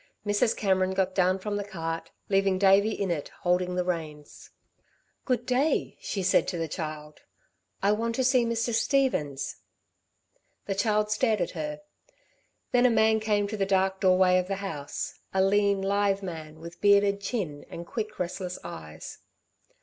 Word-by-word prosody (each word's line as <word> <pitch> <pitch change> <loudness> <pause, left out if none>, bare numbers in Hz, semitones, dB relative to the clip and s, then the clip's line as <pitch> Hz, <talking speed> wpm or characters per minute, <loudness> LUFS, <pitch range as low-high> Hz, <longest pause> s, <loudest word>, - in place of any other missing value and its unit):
Mrs. 205 +3 +1
Cameron 190 -2 +1
got 190 -1 +1
down 185 0 +2
from 205 +2 -3
the 205 - -2
cart, 165 -4 -5 0.2
leaving 195 -1 +2
Davey 195 +2 +5
in 200 -4 -2
it 150 -4 -3
holding 180 0 +1
the 180 - +1
reins. 155 -4 -5 0.8
"Good 245 -2 0
day," 260 +5 +1
she 195 - -3
said 185 - +3
to 175 - -2
the 165 -1 -2
child. 155 -2 -6 0.6
"I 200 - +4
want 230 +2 -1
to 260 - +1
see 255 -1 +4
Mr. 230 0 -1
Stevens." 225 - 0 1.1
The 200 - -1
child 210 +1 +1
stared 220 -1 +2
at 175 - -1
her. 300 0 -5 0.9
Then 250 0 +5
a - - +3
man 220 -1 +3
came 210 -2 +1
to 215 - -4
the 195 - +1
dark 190 0 +1
doorway 185 -1 +4
of 180 - -3
the 195 - -1
house, 165 -8 -5 0.2
a 190 - +4
lean, 200 0 +2
lithe 200 0 +1
man, 160 -4 -7
with 170 +1 -10
bearded 200 0 +4
chin 195 -9 -3
and 170 - -7
quick 215 +2 -5
restless 180 0 -4
eyes. 80 0 -9
195 Hz, 165 wpm, -27 LUFS, 180-215 Hz, 1.1 s, Davey